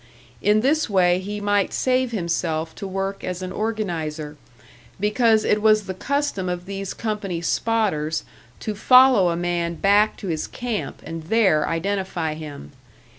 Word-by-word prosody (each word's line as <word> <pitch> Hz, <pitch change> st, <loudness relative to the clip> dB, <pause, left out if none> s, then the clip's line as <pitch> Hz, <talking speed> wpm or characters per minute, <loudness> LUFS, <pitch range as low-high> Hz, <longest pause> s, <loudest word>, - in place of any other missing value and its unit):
In 210 Hz, +1 st, +3 dB
this 295 Hz, +2 st, +1 dB
way 180 Hz, -2 st, +3 dB
he 205 Hz, +2 st, -5 dB
might 205 Hz, -1 st, +1 dB
save 255 Hz, -1 st, +1 dB
himself 165 Hz, -5 st, -2 dB
to 200 Hz, -, -7 dB
work 195 Hz, +1 st, -3 dB
as 180 Hz, 0 st, -4 dB
an 185 Hz, -, -5 dB
organiser; 165 Hz, -9 st, -3 dB, 0.6 s
because 220 Hz, +2 st, +3 dB
it 210 Hz, -, +2 dB
was 215 Hz, -1 st, +4 dB
the 190 Hz, -, -5 dB
custom 280 Hz, -4 st, -2 dB
of 180 Hz, 0 st, -4 dB
these 195 Hz, 0 st, -5 dB
company 205 Hz, -6 st, -3 dB
"spotters" 170 Hz, -5 st, 0 dB, 0.4 s
to 215 Hz, -, -3 dB
follow 250 Hz, -3 st, +6 dB
a 170 Hz, -, 0 dB
man 170 Hz, -1 st, -1 dB
back 205 Hz, +4 st, +3 dB
to 200 Hz, -, -7 dB
his 160 Hz, -3 st, -2 dB
camp 240 Hz, -4 st, -5 dB
and 165 Hz, -1 st, -6 dB
there 190 Hz, -6 st, +3 dB
identify 175 Hz, -2 st, -2 dB
him. 150 Hz, -, -9 dB
195 Hz, 150 wpm, -23 LUFS, 170-215 Hz, 0.6 s, follow